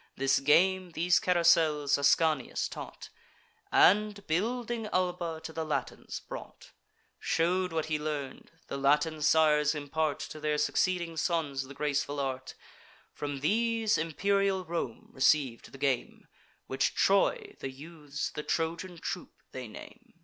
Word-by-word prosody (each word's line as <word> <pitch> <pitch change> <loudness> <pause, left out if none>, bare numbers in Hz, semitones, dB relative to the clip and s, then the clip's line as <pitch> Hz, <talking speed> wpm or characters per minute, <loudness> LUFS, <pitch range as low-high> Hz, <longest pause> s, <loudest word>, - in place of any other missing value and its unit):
This 135 +1 +2
game, 180 +5 +3
these 175 +2 +3
carousels, 160 -5 +3
Ascanius 145 0 +2
taught; - - -9 0.6
And, 205 +1 +4
building 230 +6 -1
Alba, 180 -4 -1
to 160 - -7
the 160 - -3
Latins 155 -1 -4
brought; - - -10 0.5
Shew'd 180 +2 +1
what 160 -1 -1
he 155 -1 -1
learn'd: 150 -3 -5 0.2
the - - -5
Latin 150 +3 +2
sires 150 -1 +4
impart 150 +1 -1
To 155 +1 -7
their 150 0 0
succeeding 170 +2 0
sons 150 -6 -1
the 140 - -11
graceful 145 0 -1
art; 130 -1 -4 0.6
From 145 -2 -5
these 225 +5 +2
imperial 190 +4 0
Rome 160 -9 -4
receiv'd 130 -3 +2
the - - -11
game, 135 -2 -2 0.4
Which - - 0
Troy, - - +2
the 135 - -4
youths 145 0 -6
the - - -5
Trojan 170 +3 -2
troop, 175 +2 -6
they 130 -2 -6
name. 110 - -13
160 Hz, 130 wpm, -30 LUFS, 145-180 Hz, 0.6 s, And